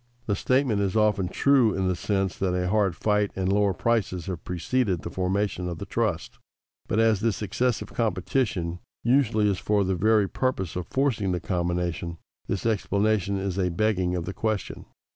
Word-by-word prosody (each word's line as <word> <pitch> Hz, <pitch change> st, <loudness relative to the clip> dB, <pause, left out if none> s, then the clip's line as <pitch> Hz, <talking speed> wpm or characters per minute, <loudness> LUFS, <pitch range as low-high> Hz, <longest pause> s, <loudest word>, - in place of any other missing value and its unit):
_ -, -, -36 dB
The 100 Hz, -, 0 dB
statement 125 Hz, -1 st, +1 dB
is 100 Hz, -1 st, -1 dB
often 105 Hz, -4 st, +2 dB
true 130 Hz, -3 st, +3 dB
in 95 Hz, -1 st, 0 dB
the 90 Hz, -, +1 dB
sense 95 Hz, +1 st, -1 dB
that 90 Hz, -2 st, 0 dB
a 90 Hz, 0 st, 0 dB
hard 100 Hz, -3 st, +2 dB
fight 105 Hz, -1 st, +1 dB
and 95 Hz, 0 st, 0 dB
lower 100 Hz, -1 st, +3 dB
prices 95 Hz, -3 st, 0 dB
have 90 Hz, -4 st, -5 dB
preceded 90 Hz, +1 st, -1 dB
the 85 Hz, -, -5 dB
formation 95 Hz, 0 st, -1 dB
of 85 Hz, -, -5 dB
the 100 Hz, -, -6 dB
trust. 100 Hz, -4 st, -2 dB, 0.5 s
But 110 Hz, -, -1 dB
as 110 Hz, -2 st, +4 dB
this 110 Hz, 0 st, -1 dB
excessive 120 Hz, +5 st, -1 dB
competition 105 Hz, -6 st, -1 dB, 0.2 s
usually 120 Hz, -4 st, +3 dB
is 100 Hz, -3 st, 0 dB
for 105 Hz, -1 st, +1 dB
the 95 Hz, 0 st, 0 dB
very 105 Hz, +2 st, +3 dB
purpose 95 Hz, -7 st, -2 dB
of 90 Hz, -1 st, -4 dB
forcing 120 Hz, -9 st, 0 dB
the 90 Hz, -, -1 dB
combination, 85 Hz, -1 st, -2 dB, 0.3 s
this 100 Hz, -, -2 dB
explanation 100 Hz, -2 st, +1 dB
is 95 Hz, -1 st, -2 dB
a 90 Hz, -1 st, +1 dB
begging 90 Hz, -1 st, 0 dB
of 85 Hz, -2 st, -3 dB
the 95 Hz, -, -4 dB
question. 105 Hz, -2 st, -3 dB
100 Hz, 180 wpm, -26 LUFS, 90-110 Hz, 0.5 s, as